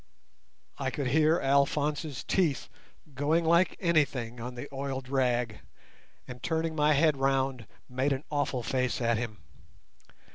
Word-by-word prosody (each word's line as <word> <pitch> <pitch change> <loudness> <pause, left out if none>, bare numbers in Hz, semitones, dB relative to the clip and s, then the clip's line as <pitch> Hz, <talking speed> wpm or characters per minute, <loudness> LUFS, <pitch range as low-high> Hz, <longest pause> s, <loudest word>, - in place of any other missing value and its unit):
I 135 -1 0
could 135 -1 -2
hear 155 +4 +3
Alphonse's 145 +1 +1
teeth 165 -8 0 0.4
going 150 +5 +1
like 170 +3 +3
anything 140 -9 0
on 125 +1 -6
the 120 +4 -6
oiled 135 -1 -4
rag, 125 -4 0 0.7
and 125 -1 -9
turning 160 +1 -1
my 150 0 +3
head 150 0 +3
round 135 -3 0 0.2
made 130 +2 -1
an 135 +1 -1
awful 145 -4 -1
face 130 0 -1
at 115 -2 +1
him. 110 -3 -5
135 Hz, 135 wpm, -29 LUFS, 125-150 Hz, 0.7 s, hear